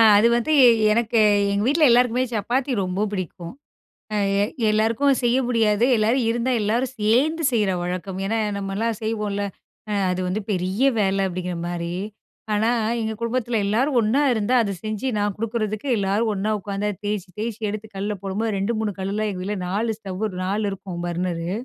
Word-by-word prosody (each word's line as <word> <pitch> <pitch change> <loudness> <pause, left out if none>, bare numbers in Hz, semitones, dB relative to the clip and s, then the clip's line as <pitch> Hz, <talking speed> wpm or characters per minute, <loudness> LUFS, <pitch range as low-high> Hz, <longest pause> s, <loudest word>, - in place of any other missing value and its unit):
அது 210 +3 +6
வந்து 310 +7 0 0.4
எனக்கு, 230 +1 +2 0.3
எங்க 200 +1 0
வீட்ல 305 +4 +3
எல்லாருக்குமே 245 +1 +3
சப்பாத்தி 250 +6 -1
ரொம்ப 185 +2 -2
பிடிக்கும். 180 -2 -5 0.6
அ - - +1 0.3
எ - - +4 0.3
எல்லாருக்கும் 230 +6 +2
செய்ய 240 +1 +3
முடியாது. 225 -2 +2
எல்லாரும் 230 +4 +2
இருந்தா 240 +2 0
எல்லாரும் 230 +5 0
சேர்ந்து 265 +9 +1
செய்ற 210 -4 +2
வழக்கம். 180 +2 -4
ஏனா 225 +3 0 0.2
நம்மலா 200 +3 -2
செய்வோல, 210 -2 -2 0.5
அ - - -1 0.2
அது 180 0 -1
வந்து 190 +4 -1
பெரிய 185 +4 -1 0.2
வேலை 195 -1 +1
அப்படிங்கிற 180 -1 -4
மாரி. 170 0 -3 0.6
ஆனா, 215 +2 +2 0.3
எங்க 220 0 -2
குடும்பத்தில 235 0 -1
எல்லாரும் 245 +8 +1
ஒண்ணா 225 +6 +2
இருந்தா 225 +1 0
அது 200 - -2
செஞ்சு 215 +3 -3
நான் 205 -1 0
குடுக்குறதுக்கு 215 +1 -2
எல்லாரும் 205 +3 +1
ஒண்ணா 200 +2 -1
உட்காந்து 200 +1 -3 0.2
தேய்ச்சி, 205 -2 -2
தேய்ச்சி 225 0 -4
எடுத்து 215 +1 -6
கல்ல 205 +2 -2
போடும்போது 205 +3 -2
2 200 +5 0
3 215 -2 -1
கல்லுல, 205 +3 -1
எங்க 185 -2 -5
வீட்ல 205 +2 -3
4 215 +4 -1
ஸ்டவ்வு 200 0 -3 0.2
4 205 +3 -1
இருக்கும் 185 -3 -6
பர்னரு 175 -1 -2
210 Hz, 160 wpm, -23 LUFS, 195-230 Hz, 0.6 s, அது